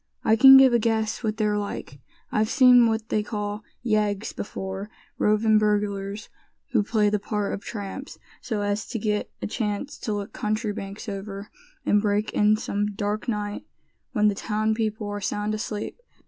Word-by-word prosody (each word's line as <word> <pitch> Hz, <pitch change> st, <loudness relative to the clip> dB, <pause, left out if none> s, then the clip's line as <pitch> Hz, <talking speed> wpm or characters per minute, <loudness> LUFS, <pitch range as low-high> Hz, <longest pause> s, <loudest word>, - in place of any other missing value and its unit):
I 220 Hz, -, +5 dB
can 270 Hz, +3 st, +10 dB
give 265 Hz, -2 st, +7 dB
a 235 Hz, -, +4 dB
guess 220 Hz, -1 st, 0 dB
what 220 Hz, -2 st, -2 dB
they're 210 Hz, -2 st, +1 dB
like. 175 Hz, -8 st, -6 dB, 0.3 s
I've 215 Hz, 0 st, +1 dB
seen 250 Hz, -3 st, +7 dB
what 220 Hz, 0 st, -2 dB
they 215 Hz, -, +1 dB
call 210 Hz, -1 st, -4 dB, 0.2 s
yeggs 215 Hz, -2 st, 0 dB
before 190 Hz, 0 st, -5 dB
now, -, -, -7 dB
roving 215 Hz, +1 st, +4 dB
burglars 205 Hz, -1 st, -1 dB, 0.4 s
who 230 Hz, -, +3 dB
play 210 Hz, 0 st, +1 dB
the 210 Hz, -, +1 dB
part 210 Hz, 0 st, -2 dB
of -, -, -4 dB
tramps, 210 Hz, +6 st, -6 dB, 0.2 s
so 220 Hz, -4 st, -2 dB
as 205 Hz, +1 st, -1 dB
to 240 Hz, -, -4 dB
get 210 Hz, -1 st, -1 dB
a -, -, 0 dB
chance 210 Hz, +5 st, -3 dB
to 220 Hz, -, -3 dB
look 205 Hz, 0 st, -4 dB
country 215 Hz, 0 st, -1 dB
banks 200 Hz, +1 st, -7 dB
over, 200 Hz, 0 st, -6 dB, 0.3 s
and 205 Hz, -, +3 dB
break 210 Hz, 0 st, 0 dB
in 210 Hz, +1 st, +4 dB
some 205 Hz, -1 st, -2 dB
dark 205 Hz, +3 st, -2 dB
night, 210 Hz, -2 st, -3 dB, 0.4 s
when 210 Hz, -5 st, +3 dB
the 205 Hz, -, +3 dB
town 215 Hz, +1 st, -1 dB
people 215 Hz, -1 st, -2 dB
are 205 Hz, 0 st, -4 dB
sound 205 Hz, +2 st, -2 dB
asleep. 215 Hz, -, -4 dB
210 Hz, 175 wpm, -25 LUFS, 205-220 Hz, 0.4 s, can